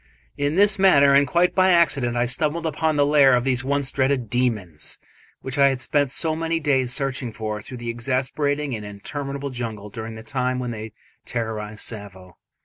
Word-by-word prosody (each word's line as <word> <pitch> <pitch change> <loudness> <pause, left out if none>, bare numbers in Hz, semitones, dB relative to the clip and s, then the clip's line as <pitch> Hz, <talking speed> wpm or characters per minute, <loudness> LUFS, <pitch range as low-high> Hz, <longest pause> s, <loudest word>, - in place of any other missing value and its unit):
In 145 +2 -1
this 200 +1 +4
manner, 140 -8 +6
and 140 0 +5
quite 175 +1 +2
by 185 0 +4
accident, 140 -9 +3
I 120 - +2
stumbled 150 +6 -1
upon 160 0 0
the 145 -1 +3
lair 140 -3 +5
of 120 - +1
these 130 -1 0
once 140 0 0
dreaded 130 -4 0
"demons", 105 -11 -1 0.4
which 135 +1 -4
I 140 - +7
had 135 -2 0
spent 145 +1 +1
so 155 +4 +2
many 165 +1 -1
days 135 -5 +1
searching 135 -2 -2
for 105 -1 -5
through 125 +4 -9
the 120 -1 -6
exasperating 135 +4 -1
and 110 -2 -5
interminable 140 +7 -5
jungle 110 -4 -6
during 110 +1 -7
the 110 - -10
time 125 +1 -2
when 125 -1 -3
they 110 -1 -7 0.3
terrorised 110 -3 -3
Tsavo. 95 -5 -10
130 Hz, 185 wpm, -23 LUFS, 115-145 Hz, 0.4 s, I